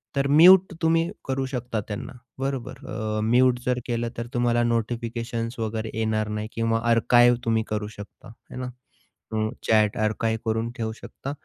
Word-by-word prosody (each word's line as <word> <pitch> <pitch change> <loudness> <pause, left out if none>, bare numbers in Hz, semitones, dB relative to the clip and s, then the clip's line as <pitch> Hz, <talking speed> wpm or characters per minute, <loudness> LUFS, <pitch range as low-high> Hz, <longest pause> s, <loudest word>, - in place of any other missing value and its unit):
तर 140 0 +1
म्यूट 175 +5 +7
तुम्ही 165 +1 +2 0.2
करू 135 0 -1
शकता 125 -4 -3
त्यांना 105 +3 -6 0.3
बरोबर. 135 -2 -4
अ, 110 -1 -3
म्यूट 125 +2 +4
जर 125 0 +1
केलं 120 -1 -2
तर 115 - -4
तुम्हाला 120 -1 +2
नोटिफिकेशन्स 115 0 -2
वगैरे 110 0 -3
येणार 110 -1 0
नाही 105 0 -3
किंवा 115 0 0
आर्काईव्ह 120 +1 +5
तुम्ही 115 -1 +2
करू 105 -1 -2
शकता 105 -1 -12
आहे 110 - -14
ना. 125 - -4 0.6
हं, 110 0 0 0.2
चॅट 110 -2 +3
आर्काईव्ह 110 +1 0
करून 110 +1 0
ठेवू 110 -1 -2
शकता 120 +4 -8
115 Hz, 155 wpm, -25 LUFS, 110-125 Hz, 0.6 s, म्यूट